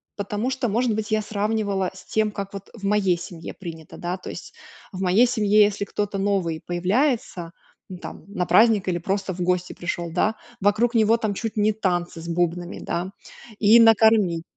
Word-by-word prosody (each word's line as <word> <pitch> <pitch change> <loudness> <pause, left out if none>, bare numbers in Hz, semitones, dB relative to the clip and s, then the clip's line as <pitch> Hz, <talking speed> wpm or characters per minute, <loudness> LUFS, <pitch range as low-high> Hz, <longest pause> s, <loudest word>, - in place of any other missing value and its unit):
потому 205 +4 -2
что, 255 -2 -1
может 230 +2 +1
быть, 215 0 -3
я 215 0 +2
сравнивала 205 -3 -1
с 185 0 -14
тем, 220 -1 0
как 200 0 -6
вот 200 0 -8
в 220 - -14
моей 195 -3 +2
семье 170 -1 -8
принято, 165 -4 -9
да. 175 +2 -3
То - - -9
есть, - - -9 0.4
в 190 -2 -6
моей 190 +6 +4
семье, 215 -3 +4
если 205 0 0
кто-то 205 0 -3
новый 190 -5 0
появляется, 185 - 0 0.4
ну, 185 - -7
там, - - -9
на 200 -3 -2
праздник 210 +2 +4
или 175 -1 0
просто 190 +2 -2
в 180 - -6
гости 180 0 0
пришёл, 175 -1 -4
да, 210 +6 +1 0.3
вокруг 215 +5 +2
него 225 0 +4
там 215 -3 -2
чуть 225 +2 -5
не 210 0 +3
танцы 175 -5 -2
с 165 - -9
бубнами, 175 +1 -1
да. 180 +2 -3 0.5
И 220 +2 +7
накормить 220 -6 +5
200 Hz, 185 wpm, -23 LUFS, 180-215 Hz, 0.5 s, И